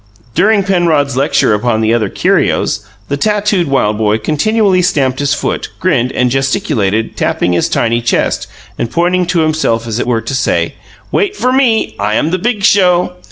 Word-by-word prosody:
During 200 +3 +3
Penrod's 165 -8 +1
lecture 130 -4 +2
upon 110 +1 0
the 110 +1 +2
other 110 -4 0
curios, 105 - 0 0.3
the 140 - -2
tattooed 210 -1 0
wild 110 -6 0
boy 110 0 +1
continually 185 - +1
stamped 135 -7 0
his 145 +1 +1
foot, - - -3
grinned, 130 -9 +1
and 125 -1 +1
gesticulated, 135 - -1
tapping 90 - 0
his 85 - 0
tiny 115 0 0
chest, 115 - -1 0.3
and 115 - -2
pointing 175 +5 0
to 175 -2 +1
himself 155 -8 0
as 115 0 -3
it - - -2
were 115 -2 0
to 115 +4 -5
say: 130 - 0 0.4
"Wait 410 -1 0
for 255 -9 0
Me! 235 - +1
I 105 +1 0
am 155 - 0
the 185 - 0
Big 215 0 -2
Show." 180 -3 +3
145 Hz, 175 wpm, -13 LUFS, 115-185 Hz, 0.4 s, During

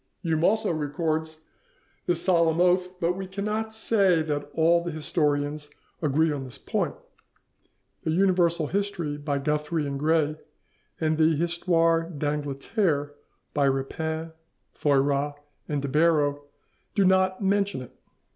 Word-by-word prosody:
Hume 160 -2 0
also 220 +2 +2
records 155 +1 -2 0.7
this 175 -1 +1
solemn 170 -3 +3
oath, 180 +1 +2
but 170 0 +2
we 190 +1 -6
cannot 210 +3 -3
say 200 -6 +2
that 145 -2 -3
all 170 +1 +4
the 175 - -3
historians 150 -1 -1 0.3
agree 155 +1 +2
on 140 -2 -3
this 130 -2 -9
point. - - -2 1.1
'The - - -2
Universal 175 -2 +2
History' 195 -7 -1
by 145 -1 -2
Guthrie 150 +2 -1
and 140 -1 -3
Gray, 155 0 +1 0.6
and 155 -1 0
the 160 0 +4
'Histoire 165 0 +1
d'Angleterre' 145 - -1 0.4
by 145 -1 +2
Rapin, 160 +4 -2 0.4
Thoyras 145 0 +1 0.3
and 145 -2 -1
de - - -1
Barrow, 145 -1 +2 0.5
do 200 - +4
not 190 +1 +3
mention 200 -7 +1
it. 125 - -13
160 Hz, 125 wpm, -26 LUFS, 145-180 Hz, 1.1 s, all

